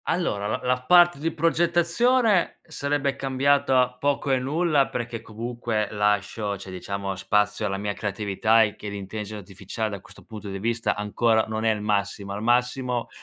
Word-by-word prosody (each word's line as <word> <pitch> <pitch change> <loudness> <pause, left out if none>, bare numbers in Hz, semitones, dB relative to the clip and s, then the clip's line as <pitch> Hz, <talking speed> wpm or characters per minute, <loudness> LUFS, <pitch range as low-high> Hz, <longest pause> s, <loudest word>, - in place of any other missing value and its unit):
Allora, 105 - -1
l - - -1
la 125 0 +1
parte 175 +2 +5
di 165 +3 -1
progettazione 175 - +2
sarebbe 140 -3 -1
cambiata 135 -1 +2
poco 140 0 0
e 130 - +3
nulla, 145 +1 +1
perché 120 -1 -5
comunque 115 -1 -3
lascio, 105 0 0
cioè 95 - -10
diciamo 100 +1 -4
spazio 105 +2 +1
alla 95 -1 -2
mia 100 +1 -2
creatività 105 +2 +1
e 105 -1 -2
che 105 - -7
l'intelligenza 105 +1 -6
artificiale 100 +3 -5
da 100 - -5
questo - - -16
punto 105 -2 -9
di 95 - -4
vista 115 +3 -1
ancora 110 +2 +1
non 110 0 -3
è 110 - +4
il 105 -1 -2
massimo. 100 -1 -1
Al 100 - -5
massimo 125 +1 0
115 Hz, 165 wpm, -25 LUFS, 105-135 Hz, -, parte